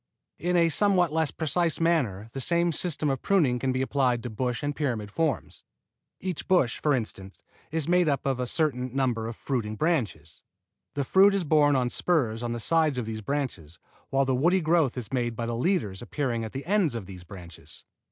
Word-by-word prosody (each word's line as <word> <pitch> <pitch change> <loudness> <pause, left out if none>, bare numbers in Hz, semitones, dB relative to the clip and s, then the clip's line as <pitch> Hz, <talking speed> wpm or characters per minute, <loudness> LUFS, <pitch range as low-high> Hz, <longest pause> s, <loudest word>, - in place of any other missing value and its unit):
In 175 +1 +1
a 170 -1 +4
somewhat 180 -2 +2
less 160 -2 +1
precise 165 +1 -1
manner 130 - +1
the 135 - -3
same 170 +4 +2
system 155 -2 0
of 135 - -3
pruning 150 -12 +2
can 130 +1 0
be 130 +1 0
applied 130 -3 +1
to 120 - -5
bush 125 +3 -2
and 145 0 -2
pyramid 115 -8 -2
forms. 160 +3 -2 0.6
Each 185 -3 -4
bush, 175 -11 +2
for 150 -2 +2
instance, 100 -5 -6 0.3
is 160 -1 -2
made 175 -2 +3
up 140 -2 -1
of 135 -2 0
a 125 - -1
certain 130 -4 -1
number 120 -5 0
of 115 - -6
fruiting 110 -6 -3
branches. 105 - -2 0.5
The 140 - 0
fruit 195 +8 +5
is 195 - 0
borne 150 -2 +4
on 125 -2 +1
spurs 120 -11 0
on 120 -1 -3
the 120 - -3
sides 155 +2 +2
of 125 - -2
these 110 0 -5
branches, 105 - -4 0.3
while 135 0 +2
the 130 - +1
woody 170 +9 +3
growth 160 -6 +2
is 120 -3 -6
made 120 -2 -1
by 115 - -3
the 115 0 -2
leaders 120 - -1
appearing 120 -2 -2
at 110 - -5
the 135 - -5
ends 185 - +1
of 110 -5 -5
these 90 -2 -10
branches. 90 -2 -12
135 Hz, 200 wpm, -27 LUFS, 115-165 Hz, 0.6 s, fruit